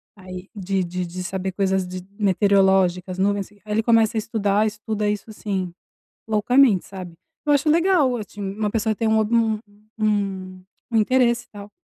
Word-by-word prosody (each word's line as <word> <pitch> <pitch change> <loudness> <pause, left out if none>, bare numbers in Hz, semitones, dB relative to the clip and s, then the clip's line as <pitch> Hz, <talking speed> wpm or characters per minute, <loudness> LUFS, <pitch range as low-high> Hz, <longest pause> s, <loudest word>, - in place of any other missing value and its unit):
aí 185 0 -10
de 195 -1 -1
de 180 +1 -3
de 180 +2 -6
saber 190 0 -3
coisas 190 -1 0
de 185 0 -7
meteorológicas, 190 -2 +2
nuvens. 200 +1 0
Aí 205 - -22
ele 215 +1 0
começa 225 -1 +3
a - - +3
estudar, 210 -1 +1
estuda 215 0 -2
isso, 210 +1 -3
assim, 190 -4 -4 0.5
loucamente, 220 -1 +3
sabe. 185 -3 -9 0.3
Eu 290 - +5
acho 285 +2 +2
legal, 330 -6 +3
assim, 210 -1 -8
uma 205 +2 -2
pessoa 220 0 0
ter 225 0 -1
um 220 0 +3
o 220 -1 +1 0.4
um 190 -3 -1 0.3
um 225 - +2
interesse 240 +1 +2
tal, 205 0 -10
205 Hz, 160 wpm, -22 LUFS, 190-220 Hz, 0.5 s, Eu